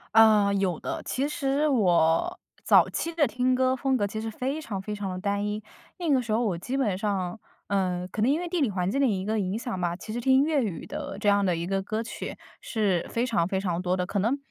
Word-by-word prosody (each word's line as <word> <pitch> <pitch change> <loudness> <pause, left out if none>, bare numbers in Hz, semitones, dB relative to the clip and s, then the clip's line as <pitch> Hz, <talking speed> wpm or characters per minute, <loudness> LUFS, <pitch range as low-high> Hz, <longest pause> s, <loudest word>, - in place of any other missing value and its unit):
嗯， 210 -3 +6
有 185 -4 0
的， - - -4
其 265 - -1
实 300 -1 0
我 175 - +3 0.3
早 - - +6
期 335 - -3
的 315 -3 +4
听 255 0 +1
歌 260 0 +2
风 265 0 +1
格 205 - +1
其 210 +2 -4
实 225 +1 -3
非 265 +7 -3
常 205 -9 -4
非 210 +2 -5
常 205 -2 -4
地 185 - -4
单 200 +1 -1
一。 210 +1 -3 0.4
那 340 -4 0
个 265 -2 +4
时 230 -3 -3
候 230 +3 +2
我 195 -7 0
基 245 +10 -4
本 220 -9 +1
上， 195 -1 -2 0.3
嗯， 185 -2 0
可 215 - -3
能 230 - +3
因 290 - +3
为 355 - -4
地 355 - -1
理 275 -6 +2
环 185 -1 -1
境 275 - 0
的 275 - +4
一 195 -5 0
个 215 +2 0
影 190 +1 -1
响 230 -4 -4
吧， 175 -1 -1
其 190 +4 -8
实 235 - -3
听 265 +2 +4
粤 300 -2 +2
语 170 -7 -5
的 195 - -6
这 205 0 +1
样 200 0 +3
的 180 -2 +2
一 165 +1 -3
个 195 +1 -1
歌 215 +3 -3
曲 230 - -6 0.2
是 200 -6 0
非 235 +1 0
常 205 -9 +1
非 190 - -1
常 180 -3 -1
多 180 0 0
的， 180 -1 -1
可 200 +3 -2
能 230 +8 +1
210 Hz, 275 characters per minute, -27 LUFS, 190-255 Hz, 0.4 s, 嗯